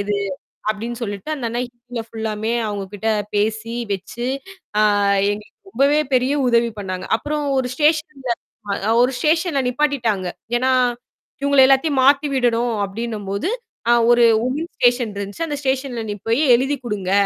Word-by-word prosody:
ஏது 205 Hz, 0 st, -1 dB, 0.5 s
அப்பிடின்னு 225 Hz, +3 st, -3 dB
சொல்லிட்டு 205 Hz, +6 st, -4 dB
அந்த 265 Hz, -6 st, -4 dB
அண்ணா 240 Hz, +2 st, -2 dB
ஹிந்தியில 240 Hz, -1 st, -8 dB
ஃபுல்லாமே 220 Hz, 0 st, -3 dB, 0.2 s
அவுங்ககிட்ட 205 Hz, +1 st, -4 dB, 0.3 s
பேசி 220 Hz, +2 st, -1 dB, 0.2 s
வச்சு, 200 Hz, +5 st, -4 dB, 0.5 s
அ -, -, +5 dB, 0.5 s
எங்களுக்கு 210 Hz, -, -10 dB
ரொம்பவே 290 Hz, -2 st, +3 dB
பெரிய 255 Hz, +2 st, +3 dB, 0.2 s
உதவி 235 Hz, -1 st, +3 dB
பண்ணாங்க. 185 Hz, -2 st, -4 dB
அப்புறம் 295 Hz, +4 st, -3 dB
ஒரு 255 Hz, -, 0 dB
ஸ்டேஷன்ல 300 Hz, -3 st, +1 dB, 0.7 s
ஒரு 250 Hz, +2 st, +2 dB
ஸ்டேஷன்ல 320 Hz, 0 st, +1 dB
நிப்பாட்டிட்டாங்க. 245 Hz, -8 st, 0 dB, 0.3 s
ஏன்னா 255 Hz, +2 st, +1 dB, 0.7 s
இவுங்க 280 Hz, -1 st, +5 dB
எல்லாத்தையும் 270 Hz, +1 st, +3 dB
மாத்தி 280 Hz, +2 st, +5 dB
விடணும் 240 Hz, -2 st, +1 dB
அப்பிடின்னம்போது, 205 Hz, -, -3 dB, 0.4 s
அ -, -, +7 dB, 0.2 s
ஒரு 240 Hz, 0 st, +6 dB, 0.2 s
வுமன்ஸ் 295 Hz, +8 st, -3 dB
ஸ்டேஷன் 245 Hz, -2 st, +2 dB
இருந்துச்சு. 200 Hz, +11 st, -4 dB
அந்த 295 Hz, -, -2 dB
ஸ்டேஷன்ல 265 Hz, -3 st, -1 dB
நீ -, -, -2 dB
போய் 230 Hz, +6 st, +3 dB
எழுதிக் 270 Hz, +2 st, -1 dB
கொடுங்க. 200 Hz, -5 st, -2 dB
240 Hz, 135 wpm, -20 LUFS, 215-275 Hz, 0.7 s, அ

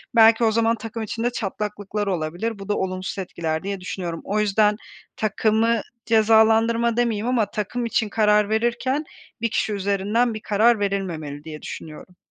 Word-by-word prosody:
belki 225 Hz, 0 st, +6 dB
o 225 Hz, -, +4 dB
zaman 230 Hz, +1 st, +2 dB
takım 225 Hz, 0 st, -6 dB
içinde 230 Hz, +3 st, -2 dB
çatlaklıklar 210 Hz, -1 st, -3 dB
olabilir, 185 Hz, +5 st, -2 dB
bu 195 Hz, +1 st, -9 dB
da 205 Hz, -, +1 dB
olumsuz 185 Hz, +1 st, -3 dB
etkiler 165 Hz, -3 st, -3 dB
diye 200 Hz, 0 st, -3 dB
düşünüyorum. 180 Hz, -2 st, -5 dB
O 210 Hz, +2 st, -1 dB
yüzden 210 Hz, 0 st, +3 dB, 0.4 s
takımı 220 Hz, +1 st, +1 dB, 0.2 s
cezalandırma 225 Hz, +1 st, +4 dB
demeyeyim 230 Hz, -2 st, 0 dB
ama 245 Hz, -4 st, +2 dB
takım 225 Hz, +4 st, -3 dB
için 225 Hz, -1 st, 0 dB
karar 210 Hz, -1 st, +3 dB
verirken 240 Hz, +6 st, 0 dB, 0.4 s
1 230 Hz, -, +1 dB
kişi 215 Hz, -, -1 dB
üzerinden 205 Hz, +4 st, 0 dB
bir 215 Hz, -, -6 dB
karar 220 Hz, +2 st, +3 dB
verilmemeli 170 Hz, -8 st, -3 dB
diye 155 Hz, -1 st, -8 dB
düşünüyorum. 160 Hz, +3 st, -9 dB
210 Hz, 150 wpm, -23 LUFS, 195-230 Hz, 0.4 s, belki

